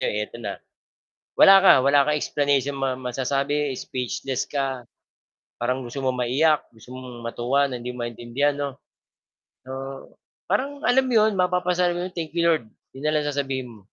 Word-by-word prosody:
'eto 105 +2 -2
na. 100 -2 -5 0.8
Wala 195 - +9
ka, - - +9
wala 140 0 +5
kang 150 0 +1
explanation 140 -1 0
ma 135 -1 -1
masasabi, 135 +3 -1
speechless 130 +1 -3
ka. 135 -4 -3 0.7
Parang 125 +2 -1
gusto 120 +4 -6
mong 130 -1 0
maiyak, 150 +5 +3
gusto 115 +2 -14
mong 125 -2 -9
matuwa 125 +4 +1
na 125 -3 -4
hindi 125 +1 -5
mo 120 - -4
maintindihan 120 +5 -1
'no. 140 -1 -2 1.0
Oo, 135 +1 -8 0.3
parang 280 +2 -1
alam 260 +2 +4
'yon, 220 -4 +3
mapapasabi 180 -1 +1
ka 175 - -3
ng, - - -33
"Thank 165 -3 -4
you 170 - +2
Lord," 160 -8 +2 0.3
'yon 135 - -9
na - - +2
lang 150 -1 0
sasabihin 135 -3 -2
mo. 110 -3 -15
135 Hz, 165 wpm, -24 LUFS, 125-150 Hz, 1.0 s, Wala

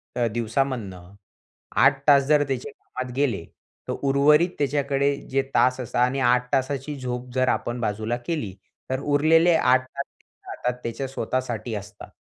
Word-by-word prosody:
अ, 120 -1 +1
दिवसामधनं 115 -6 -2 0.7
8 135 -1 +5
तास 140 -2 +7
जर 150 -1 +4
त्याचे 135 +1 -3
कामात 130 -2 -8
गेले, 125 -11 0 0.4
तर - - -1
उर्वरित 145 +5 +4
त्याच्याकडे 140 0 +1 0.2
जे 135 - +2
तास 130 +1 +3
असता 120 -1 -3
आणि 135 +2 -2
8 125 0 +2
तासाची 135 +2 -1
झोप 125 0 -4
जर 130 0 +2
आपण 120 +1 -1
बाजूला 110 +2 -1
केली, 150 - -2 0.4
तर 130 0 -1
उरलेले 160 +4 +4
8 130 -3 +3
तास 140 +1 -6 0.4
हातात 125 0 -3
त्याच्या 115 +4 -3
स्वतःसाठी 125 -4 -3
असतात. 105 0 -9
130 Hz, 145 wpm, -24 LUFS, 120-140 Hz, 0.7 s, तास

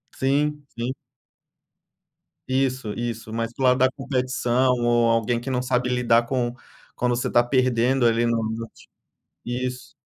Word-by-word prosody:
Sim, 145 +2 0
sim. 120 +2 -2 1.5
Isso, 130 -4 0
isso, 115 -2 -5
mas 115 +1 -3
para 135 - -4
o - - +4
lado 125 - +4
da 130 0 +3
competição 130 -2 0
ou 120 -1 +3
alguém 115 +1 +1
que 120 - -6
não 125 -1 0
sabe 125 0 0
lidar 120 -1 +3
com 120 -1 -1 0.4
quando 125 -1 0
você 120 - -2
tá 120 - +5
perdendo 130 0 +2
ali 115 0 +3
no 115 -1 +1
esporte, 115 +1 -8 0.6
isso. 125 +1 -4
125 Hz, 150 wpm, -24 LUFS, 120-130 Hz, 1.5 s, tá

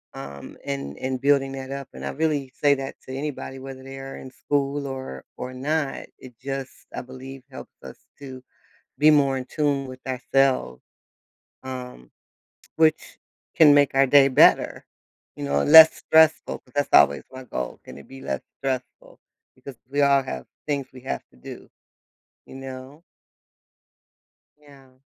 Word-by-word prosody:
Um, 70 +1 -9
and 70 +1 -5
and 130 -1 -3
building 140 -1 +2
that 135 -1 -7
up. 140 -1 -6
And - - -9
I - - -2
really 145 -3 -1
say 145 -1 +5
that 135 -1 -6
to 130 - -9
anybody 135 -1 -5
whether 130 0 -9
they 135 0 -9
are 135 0 -8
in 130 - -10
school 140 +1 -2
or 130 - -7
or 125 - -6
not. 140 +2 -2
It 130 -1 -13
just, 135 -1 -7
I - - -3
believe, 130 +1 -11
helps 130 - -10
us - - -10 0.2
to 130 -2 -10 0.6
be 150 +1 +6
more 140 -3 +3
in 130 - -7
tune 145 -2 -1
with 130 0 -10
ourself, 130 - +1 0.9
um, 125 - -8 0.6
which 160 -1 +1 0.4
can 150 -3 +7
make 145 -1 +3
our 135 0 +5
day 140 0 +6
better, 130 - +4 0.5
you - - -6
know, 70 0 +1
less 160 +1 +10
stressful. 160 0 +3
But, 125 - -25
that's 145 0 0
always 70 0 +5
my 130 0 -9
goal, 65 - -5
"Can - - -11
it 70 - -14
be 135 - -11
less - - -3 0.2
stressful?" 130 -2 -5 0.4
Because 130 +1 -11
we 145 +1 0
all 140 -1 +4
have 65 - -6 0.2
things 140 -3 -2
we 130 - -12
have 130 - -4
to - - -23
do. - - -11 0.8
You - - -11
know? 135 +2 -9 1.6
Yeah. 135 -3 -20
135 Hz, 160 wpm, -24 LUFS, 130-140 Hz, 1.6 s, less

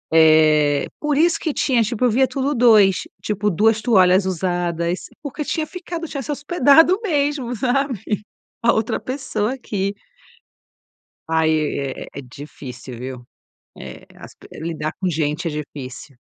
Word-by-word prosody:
Eh, 155 -2 +5
por 295 -2 0
isso 330 +2 +3
que 315 - -1
tinha, 250 -4 +2
tipo 235 +3 -1
eu 245 - +3
via 260 +4 +3
tudo 275 +2 -1
2, 220 -7 +5 0.3
tipo, 210 0 0
2 215 +4 +2
toalhas 190 -4 +4
usadas 175 -1 -1 0.2
porque 295 +1 -4
tinha 315 +2 -2
ficado 345 0 -6
tinha 280 -2 -5
se 295 - -5
hospedado 320 +4 +4
mesmo, 285 - -1
sabe, 260 0 0 0.6
a 235 - +5
outra 220 0 -1
pessoa 255 -4 -3
aqui. 200 -6 -3 1.4
Aí 160 -1 +1
é 140 -2 -5
é - - -6
difícil, 130 -2 -10
viu? 125 0 -7 0.6
Eh, - - -10
as - - -12
pe - - -16
lidar 155 -2 -3
com 185 - +1
gente 155 +1 -1
é - - -2
difícil. 140 -2 -8
205 Hz, 145 wpm, -21 LUFS, -, 1.4 s, Eh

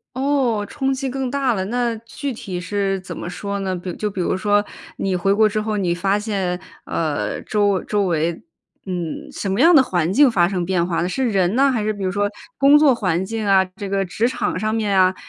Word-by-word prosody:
哦， 260 -6 +1
冲 270 -2 -1
击 265 0 -2
更 260 -1 -3
大 275 -3 +1
了， 190 -3 -2
那 240 +2 0
具 245 +5 -6
体 195 -6 -6
是 195 +1 -1
怎 185 - -8
么 175 - -5
说 200 +2 -4
呢？ 190 -1 -2
比 180 0 -5
就 210 - -2
比 195 - -5
如 180 - 0
说 205 +1 +2 0.3
你 195 -1 -1
回 185 +2 +1
国 215 +1 +4
之 215 +1 -1
后， 215 0 -2
你 180 -4 0
发 195 +3 +1
现， 195 -4 -2 0.3
呃， 155 -3 -2
周 205 -3 +1
周 205 -1 0
围 170 -2 +1 0.5
嗯， 175 -4 -4
什 200 - -4
么 200 - 0
样 335 +5 +7
的 275 - +8
环 175 -8 0
境 275 +2 +6
发 175 -6 +3
生 180 -2 -2
变 175 -1 +1
化 170 -1 -1
呢？ 180 - 0
是 260 +5 0
人 190 -2 +1
呢？ 275 +2 +4
还 240 -5 0
是 215 - +1
比 205 -2 -7
如 185 - 0
说 205 +2 0 0.3
工 285 +1 +6
作 295 -3 +5
环 185 -5 0
境 220 +1 -3
啊， 195 -1 +5
这 205 -2 -5
个 195 0 0
职 205 +5 0
场 240 -7 -2
上 215 +2 -1
面 205 -3 +1
啊， 185 0 +4
205 Hz, 245 characters per minute, -21 LUFS, 185-230 Hz, 0.5 s, 的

